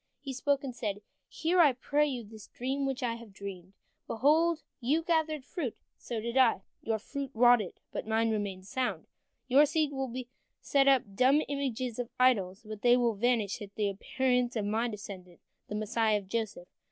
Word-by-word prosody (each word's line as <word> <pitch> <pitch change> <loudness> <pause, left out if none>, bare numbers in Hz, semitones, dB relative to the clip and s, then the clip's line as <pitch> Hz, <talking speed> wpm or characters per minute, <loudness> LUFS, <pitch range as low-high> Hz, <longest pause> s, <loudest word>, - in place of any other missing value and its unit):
He 275 -2 -6
spoke, 280 +2 0
and 255 -3 -5
said: 205 -3 -3 0.2
"Hear, 345 +3 0
I 300 -6 +7
pray 290 +4 +1
you, 255 -4 -3
this 215 0 -12
dream 270 +3 -2
which 270 0 -3
I 235 -2 0
have 230 -3 -12
dreamed. 195 -2 -8 0.3
Behold, 310 +7 +3 0.2
you 285 +6 +1
gathered 315 -4 0
fruit, 285 -7 -4
and - - -42
so 235 -2 -4
did 235 +2 -4
I. 240 -7 +4 0.2
Your 225 -1 0
fruit 275 +5 -5
rotted, 240 -4 +4
but - - -5
mine 225 +1 +2
remained 200 -3 -3
sound. 255 +5 -2 0.4
Your 280 +3 +6
seed 305 0 +1
will 270 -3 -3 0.5
set 275 -1 +2
up 270 -2 +5
dumb 265 +8 +4
images 255 -4 -2
of 245 -1 -3
idols, 215 -5 +2
but 215 -1 -7
they 245 0 +5
will 240 -2 +2
vanish 220 -1 0
at 200 -1 -9
the 210 -2 +1
appearance 250 +4 0
of 215 -3 -1
my 220 +3 0
descendant, 195 -5 -8 0.3
the 210 - -5
Messiah 215 0 +1
of 200 -2 -8
Joseph. 215 -4 -3
240 Hz, 185 wpm, -30 LUFS, 215-275 Hz, 0.5 s, I